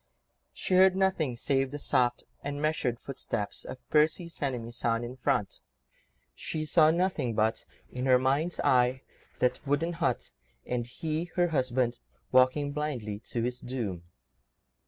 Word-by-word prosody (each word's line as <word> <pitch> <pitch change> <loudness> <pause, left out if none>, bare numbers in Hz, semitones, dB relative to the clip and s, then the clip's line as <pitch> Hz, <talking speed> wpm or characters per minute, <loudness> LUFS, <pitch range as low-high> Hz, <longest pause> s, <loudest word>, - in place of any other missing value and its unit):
She - - -3
heard 185 0 +6
nothing 190 -9 +1
save 135 +2 +1
the 145 - -5
soft 125 -4 +1 0.2
and 145 0 -3
measured 145 -6 0
footsteps 115 -6 -4
of 130 - -9
Percy's 155 +2 +2
enemies 120 -4 -3
on 115 0 +1
in 120 +2 -6
front; 105 -6 -1 0.7
she 155 -1 -4
saw 155 0 +5
nothing 160 - 0
but—in 115 +3 -2
her 130 -1 +7
mind's 140 +7 0
eye—that 125 0 0
wooden 155 +5 +1
hut, 165 - -1 0.3
and 120 -1 -2
he, 160 +5 -3
her 175 -1 +3
husband, 130 -4 0 0.3
walking 130 +3 +4
blindly 130 -9 -3
to 115 - -2
his 125 +1 -2
doom. 115 -9 -4
130 Hz, 135 wpm, -29 LUFS, 120-155 Hz, 0.7 s, her